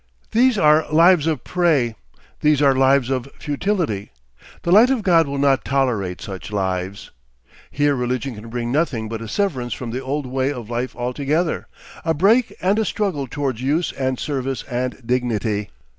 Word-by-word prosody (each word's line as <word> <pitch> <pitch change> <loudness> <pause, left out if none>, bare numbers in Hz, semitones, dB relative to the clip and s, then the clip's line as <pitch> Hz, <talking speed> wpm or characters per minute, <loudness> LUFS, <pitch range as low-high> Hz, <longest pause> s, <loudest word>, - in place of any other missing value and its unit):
These 245 0 +3
are 155 -3 +4
lives 165 0 +5
of 155 -7 -1
prey, 155 -10 +1 0.5
these 150 -1 +3
are 140 -2 +5
lives 135 -1 +3
of 130 0 -2
futility; 150 - -2 0.5
the 170 - 0
light 220 +7 +7
of 260 -5 0
God 165 -5 +4
will 140 0 -3
not 140 -1 +2
tolerate 115 -10 -1
such 95 +1 -7
lives. 95 -1 -3 0.6
Here 145 0 +1
religion 125 +1 -2
can 110 +1 -10
bring 120 0 -3
nothing 130 -7 0
but 115 0 -5
a 115 - -6
severance 125 - -1
from 120 -3 -6
the 125 +3 -3
old 140 +2 -3
way 130 +2 -1
of 120 -5 -7
life 120 +1 -3
altogether, 140 +7 -1 0.4
a 160 -1 0
break 220 +9 +3
and 195 +4 +2
a - - +2
struggle 190 -11 -2
towards 135 -3 -3
use 150 +6 0
and 130 -1 -2
service 135 -3 -3
and 125 0 -3
dignity. 115 -4 -1
135 Hz, 170 wpm, -21 LUFS, 120-160 Hz, 0.6 s, light